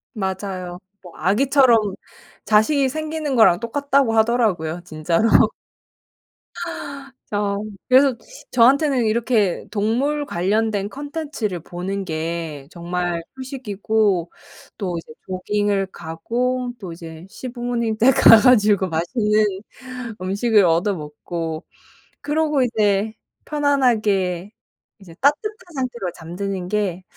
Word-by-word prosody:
맞아요. 190 -3 -4 0.2
뭐 175 -2 -13
아기처럼 245 - +4 0.7
자식이 260 +7 +3
생기는 310 -1 -3
거랑 220 -7 +5
똑같다고 275 +1 +1
하더라고요 215 -8 +1
진짜로. 165 +5 0 2.0
어. 205 -1 -1 0.3
그래서 265 0 +5 0.4
저한테는 260 +1 +4
이렇게 220 -3 +1
동물 250 +8 0
관련된 205 +1 0
콘텐츠를 285 - -4
보는 180 +4 -5
게 160 -4 -4
정말 175 0 -3 0.2
휴식이고 215 - -1 0.5
또 180 -4 -3
이제 165 -1 -9
조깅을 195 +1 0
가고 245 +10 -3
또 190 -5 -7
이제 165 0 -10
시부모님 240 -2 -3
댁 250 +5 +5
가 - - +10
가지고 210 -5 +4
맛있는 210 +6 +1 0.8
음식을 205 +2 +3
얻어먹고 165 -2 -2 0.6
그러고 295 -1 +1
이제 215 -3 +1 0.3
편안하게 215 - +1 0.5
이제 185 -4 -14
따뜻한 290 +9 +3 0.3
상태로 240 -8 -3
잠드는 180 +3 -5
게 190 -3 -1
210 Hz, 240 characters per minute, -21 LUFS, 180-250 Hz, 2.0 s, 가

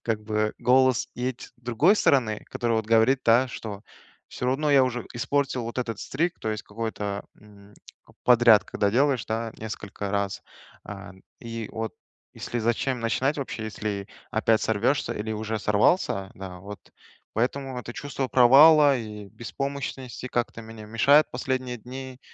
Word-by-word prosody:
как 110 -2 -1
бы, 105 0 -1
голос 130 -1 +3
есть 125 0 -3
с - - -16
другой 125 - +2
стороны, 115 - +2
который, 120 -1 -1
вот, 110 - -2
говорит, 115 +4 +4
да, 120 +3 +4
что 105 -3 -7 0.5
всё 125 - -5
равно 145 +4 +1
я 135 -2 +6
уже 125 -1 -3
испортил 130 0 -1
вот 115 +2 -5
этот 115 -4 -3
streak 165 +6 -1
то 110 - -2
есть 110 -1 -4
какой-то, 105 -2 -4 0.2
м, 105 -1 -18 0.5
подряд, 120 -3 +6
когда 100 -1 0
делаешь, 130 0 +2
да, 115 +1 -2
несколько 105 -2 -6
раз. 100 -1 -2 0.4
А, 100 -2 -8 0.3
и 115 -2 -6
вот, 110 0 -4 0.4
если 120 - -4
зачем 120 +3 0
начинать 130 +6 0
вообще, 120 -5 -4
если 105 -2 -4 0.2
опять 110 0 +2
сорвешься 115 +6 +1
или 110 +1 -4
уже 110 0 -3
сорвался, 100 - +1
да, 95 -1 -8
вот, 100 +1 -9 0.5
поэтому 130 +3 -2
это 120 -1 -7
чувство 135 0 -4
провала 140 +3 +7
и 105 -2 -8
беспомощности 130 +1 -5
как-то 120 -2 -2
мне 110 -1 -10
мешает 140 +7 +4
последние 130 0 -3
дни, 130 +2 -9
115 Hz, 150 wpm, -26 LUFS, 110-130 Hz, 0.5 s, провала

